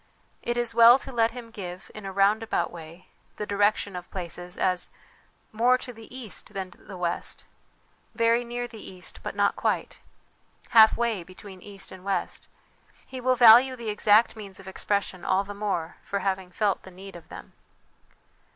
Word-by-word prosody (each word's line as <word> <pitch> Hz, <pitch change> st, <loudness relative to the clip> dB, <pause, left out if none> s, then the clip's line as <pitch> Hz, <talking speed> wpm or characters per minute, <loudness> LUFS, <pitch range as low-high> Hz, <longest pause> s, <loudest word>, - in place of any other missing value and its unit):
It 240 Hz, 0 st, -2 dB
is 240 Hz, -1 st, +1 dB
well 235 Hz, +2 st, +8 dB
to 270 Hz, -, -8 dB
let 230 Hz, -2 st, +2 dB
him 230 Hz, -1 st, -10 dB
give, 185 Hz, -4 st, -8 dB
in 210 Hz, -2 st, -8 dB
a -, -, -4 dB
round 200 Hz, +3 st, +3 dB
about 225 Hz, -, -1 dB
way, 165 Hz, +1 st, -12 dB, 0.3 s
the 210 Hz, -, -4 dB
direction 205 Hz, -1 st, +1 dB
of 180 Hz, -1 st, -7 dB
places 175 Hz, -1 st, -7 dB
as 180 Hz, -1 st, 0 dB, 0.3 s
' -, -, -34 dB, 0.3 s
more 240 Hz, +3 st, +3 dB
to 250 Hz, 0 st, -8 dB
the 225 Hz, -1 st, -13 dB
east 220 Hz, -4 st, -6 dB
than 190 Hz, -1 st, -4 dB
the 190 Hz, 0 st, -12 dB
west,' 175 Hz, -1 st, -3 dB, 0.4 s
' -, -, -38 dB, 0.3 s
very 230 Hz, +1 st, +3 dB
near 240 Hz, 0 st, -4 dB
the 225 Hz, -3 st, -11 dB
east 185 Hz, -1 st, -10 dB
but -, -, -6 dB
not -, -, +2 dB
quite,' -, -, -2 dB, 0.4 s
' -, -, -40 dB, 0.3 s
half 220 Hz, -1 st, +7 dB
way 235 Hz, -5 st, 0 dB
between 185 Hz, +2 st, -12 dB
east 200 Hz, -1 st, -8 dB
and 185 Hz, -1 st, -11 dB
west.' 195 Hz, -2 st, -3 dB, 0.6 s
He 260 Hz, -1 st, -8 dB
will 255 Hz, +1 st, +3 dB
value 245 Hz, +2 st, +8 dB
the 235 Hz, -3 st, -5 dB
exact 210 Hz, +2 st, +4 dB
means 200 Hz, -3 st, -9 dB
of 195 Hz, -, -13 dB
expression 190 Hz, -1 st, -2 dB
all 190 Hz, +1 st, +2 dB
the 205 Hz, +1 st, -8 dB
more 195 Hz, -5 st, -3 dB
for 200 Hz, -, -3 dB
having 190 Hz, -1 st, -2 dB
felt 200 Hz, +2 st, 0 dB
the -, -, -12 dB
need 190 Hz, +1 st, -11 dB
of 170 Hz, -, -13 dB
them. -, -, -11 dB
205 Hz, 190 wpm, -26 LUFS, 185-230 Hz, 0.6 s, well